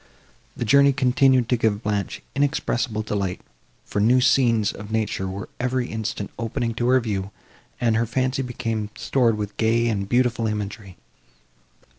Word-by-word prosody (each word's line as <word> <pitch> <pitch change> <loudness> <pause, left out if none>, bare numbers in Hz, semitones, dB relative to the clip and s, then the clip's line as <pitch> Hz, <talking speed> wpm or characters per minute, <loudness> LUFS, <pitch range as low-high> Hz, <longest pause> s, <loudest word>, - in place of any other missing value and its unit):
The 120 - -2
journey 140 +4 +5
continued 130 -2 +3
to 125 - +3
give 110 -2 0
Blanche 105 -1 -2
inexpressible 125 -6 0
delight, 100 -4 -2 0.5
for - - -3
new 120 +4 +5
scenes 120 -5 +3
of 105 +1 -9
nature 110 -3 -1
were 95 +1 -5
every 125 0 -1
instant 110 -2 -4
opening 115 +1 -2
to 120 +1 -1
her 130 +1 +5
view, 100 -5 -3 0.5
and 115 -3 +2
her 115 +1 +1
fancy 130 +3 0
became 115 -4 -3
stored 120 -5 +1
with 105 -1 -5
gay 115 +1 +2
and 100 -3 -2
beautiful 120 -2 +2
imagery. 105 -3 -5
115 Hz, 150 wpm, -23 LUFS, 105-125 Hz, 0.5 s, journey